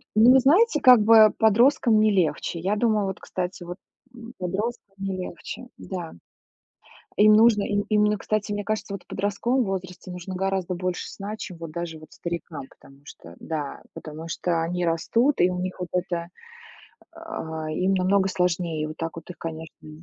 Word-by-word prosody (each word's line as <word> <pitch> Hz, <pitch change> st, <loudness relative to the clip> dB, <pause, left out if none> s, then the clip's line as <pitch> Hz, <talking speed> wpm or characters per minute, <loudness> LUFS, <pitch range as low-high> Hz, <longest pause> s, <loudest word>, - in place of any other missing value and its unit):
Ну, 225 Hz, +4 st, +7 dB
вы 265 Hz, -, +7 dB
знаете, 320 Hz, -, +4 dB
как 250 Hz, -3 st, +8 dB
бы 220 Hz, 0 st, +7 dB
подросткам 225 Hz, +1 st, +4 dB
не 215 Hz, 0 st, +4 dB
легче. 170 Hz, -2 st, 0 dB
Я 195 Hz, +5 st, 0 dB
думаю, 215 Hz, -2 st, +1 dB
вот, 190 Hz, -, -5 dB
кстати, 180 Hz, 0 st, -5 dB
вот, 175 Hz, +1 st, -7 dB, 0.4 s
м 235 Hz, 0 st, -11 dB
подросткам 195 Hz, +2 st, -4 dB
не 195 Hz, -1 st, -3 dB
легче, 185 Hz, +6 st, -7 dB
да. 175 Hz, -4 st, -6 dB, 1.0 s
Им 215 Hz, +1 st, +6 dB
нужно, 215 Hz, -1 st, +5 dB
им 205 Hz, 0 st, 0 dB
именно, 210 Hz, -1 st, +3 dB
кстати, 210 Hz, 0 st, -2 dB
мне 205 Hz, 0 st, -3 dB
кажется, 215 Hz, -1 st, -3 dB
вот 195 Hz, -, -5 dB
в -, -, -48 dB
подростковом 205 Hz, +6 st, 0 dB
возрасте 185 Hz, -2 st, -5 dB
нужно 180 Hz, +1 st, -7 dB
гораздо 190 Hz, -1 st, -1 dB
больше 180 Hz, 0 st, -3 dB
сна, 205 Hz, +2 st, -6 dB
чем 180 Hz, -5 st, -8 dB
вот 165 Hz, -2 st, -8 dB
даже 170 Hz, -1 st, -5 dB
вот 155 Hz, -, -15 dB
старикам, 170 Hz, -4 st, -6 dB
потому 135 Hz, 0 st, -19 dB
что, 85 Hz, -9 st, -13 dB
да, 150 Hz, -3 st, -5 dB
потому 155 Hz, +1 st, -8 dB
что 165 Hz, 0 st, -1 dB
они 175 Hz, +1 st, -1 dB
растут, 230 Hz, -, +1 dB
и 180 Hz, -, +5 dB
у 180 Hz, 0 st, -3 dB
них 185 Hz, +1 st, -4 dB
вот 180 Hz, -1 st, -5 dB
это, 175 Hz, -1 st, -2 dB, 0.9 s
а, 160 Hz, -, -6 dB
им 185 Hz, +5 st, 0 dB
намного 190 Hz, +1 st, +2 dB
сложнее. 170 Hz, -4 st, -1 dB
Вот 155 Hz, -, -8 dB
так 165 Hz, 0 st, -4 dB
вот 165 Hz, -, -10 dB
их, 180 Hz, -, -9 dB
конечно. 160 Hz, -1 st, -8 dB
185 Hz, 175 wpm, -25 LUFS, 170-215 Hz, 1.0 s, как